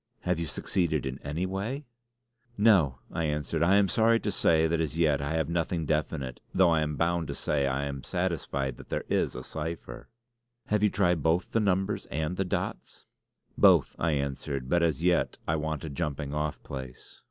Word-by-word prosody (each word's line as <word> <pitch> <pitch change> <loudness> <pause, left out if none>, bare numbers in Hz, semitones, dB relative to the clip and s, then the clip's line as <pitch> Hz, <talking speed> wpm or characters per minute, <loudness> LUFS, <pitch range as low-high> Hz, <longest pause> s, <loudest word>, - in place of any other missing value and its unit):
"Have 90 -2 0
you 85 - -2
succeeded 80 +1 -1
in 65 +1 -4
any 75 +5 -3
way?" 110 +10 -3 0.7
"No!" 95 - +4
I 85 - -1
answered. 75 +1 -1
"I 90 +4 +5
am 100 -1 +5
sorry 115 +2 +3
to 105 - -1
say 80 -4 +3
that 80 0 0
as 80 -1 -2
yet 75 -4 +3
I 70 +2 -2
have 80 -1 0
nothing 85 0 -1
definite; 75 -4 -2 0.2
though 90 -2 +5
I 80 -1 +3
am 75 -1 -1
bound 85 0 0
to - - -4
say 70 -2 0
I 70 +1 -1
am 70 -1 -4
satisfied 80 -8 -2
that - - -13
there - - -2
is - - +1
a 65 - -6
cipher." 80 -5 -6 0.6
"Have 105 -1 +2
you 105 - +4
tried 90 -5 +2
both 80 +4 +1
the 115 - +2
numbers 95 -1 0
and 80 +3 -2
the 95 - -1
dots?" 90 - -4 0.5
"Both," - - +5
I 80 -1 +1
answered; 70 -2 -3
"but 85 +2 +3
as 80 -2 +1
yet 90 0 +2
I 80 - +2
want 80 -2 -3
a - - -4
jumping 70 -2 -3
off 75 0 -2
place." 65 -2 -9
80 Hz, 195 wpm, -28 LUFS, 70-90 Hz, 0.7 s, I